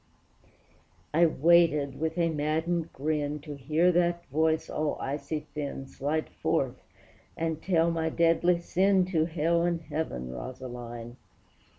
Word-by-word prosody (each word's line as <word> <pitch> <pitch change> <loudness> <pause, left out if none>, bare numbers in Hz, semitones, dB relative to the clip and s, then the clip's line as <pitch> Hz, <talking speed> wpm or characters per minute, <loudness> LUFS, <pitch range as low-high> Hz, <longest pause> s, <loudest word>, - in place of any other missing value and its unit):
I 170 +2 +5
waited 155 -3 +3
with 160 +2 -2
a 170 -1 +2
maddened 160 +2 -1
grin 150 +1 -1
To 150 0 -7
hear 155 +6 +2
that 175 0 +1
voice 160 +2 +1
all 155 -1 -1
icy 145 +2 -3
thin 140 -2 -4
Slide 150 +4 -2
forth - - -1 0.6
and 160 -1 -2
tell 170 -3 +2
my 160 -1 0
deadly 170 +2 +3
sin 190 +2 +2
To 160 -3 +2
hell 170 +1 +1
and 170 -1 +1
heaven, 150 - -4
Rosaline! 120 - -7
160 Hz, 125 wpm, -28 LUFS, 145-170 Hz, 0.6 s, I